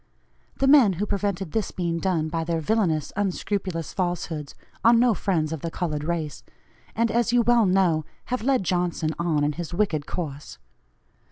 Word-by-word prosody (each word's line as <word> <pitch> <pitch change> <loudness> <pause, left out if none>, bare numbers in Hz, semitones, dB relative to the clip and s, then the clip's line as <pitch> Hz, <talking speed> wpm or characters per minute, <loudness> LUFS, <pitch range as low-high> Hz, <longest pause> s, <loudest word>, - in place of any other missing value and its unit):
The 270 - +1
men 270 -8 +6
who 190 +4 -2
prevented 200 -4 -2
this 220 -3 -1
being 170 -2 -2
done 170 -4 0
by 165 +1 -2
their 165 0 -1
villanous 160 -4 0
unscrupulous 190 -3 -2
falsehoods, 175 -5 -3 0.3
are 230 - +7
no 240 0 +4
friends 165 -5 -1
of 160 - -5
the 165 - -3
colored 155 -3 -3
race, 160 -2 -3 0.5
and, 230 0 +1
as 235 +1 +1
you 240 -1 +4
well 235 -2 +4
know, 180 -4 +2 0.3
have 250 - 0
led 255 -2 +2
Johnson 175 -3 0
on 160 -4 +1
in 145 - +2
his 170 +2 -6
wicked 165 -7 0
course. 150 - -5
175 Hz, 170 wpm, -25 LUFS, 160-210 Hz, 0.5 s, are